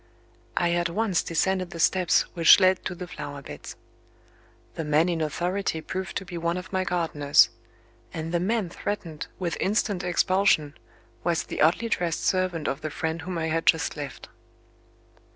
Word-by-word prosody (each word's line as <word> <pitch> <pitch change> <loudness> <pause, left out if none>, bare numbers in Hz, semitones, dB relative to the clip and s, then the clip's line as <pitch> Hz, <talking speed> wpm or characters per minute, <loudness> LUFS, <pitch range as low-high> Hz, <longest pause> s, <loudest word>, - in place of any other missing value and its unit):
I 175 -1 +2
at 175 0 +1
once 195 0 +1
descended 185 +2 0
the 170 - -8
steps 180 +1 +3
which 170 +1 +7
led 185 -1 +3
to 180 - -3
the 180 - -6
flower 145 -3 -7
beds. - - -9 1.0
The 160 - -4
man 155 +2 +3
in 165 -2 -1
authority 175 +3 -1
proved 190 +4 -4
to 195 - -5
be 175 -1 -6
one 170 +1 -1
of 180 +2 -8
my 185 0 +1
gardeners; 165 -5 +3 0.6
and 160 0 -5
the 175 - +1
man 205 +1 0
threatened 170 -8 -5
with 175 -3 -2
instant 200 -2 0
expulsion 180 -4 +2 0.5
was 170 -1 +1
the - - -5
oddly 165 +9 +3
dressed 175 -7 -1
servant 185 -4 0
of 135 - -2
the 155 - -3
friend 160 +2 -3
whom 180 +1 -4
I 160 -1 -1
had 165 +1 -1
just 160 -3 +3
left. 145 -3 -7
175 Hz, 170 wpm, -26 LUFS, 160-185 Hz, 1.0 s, which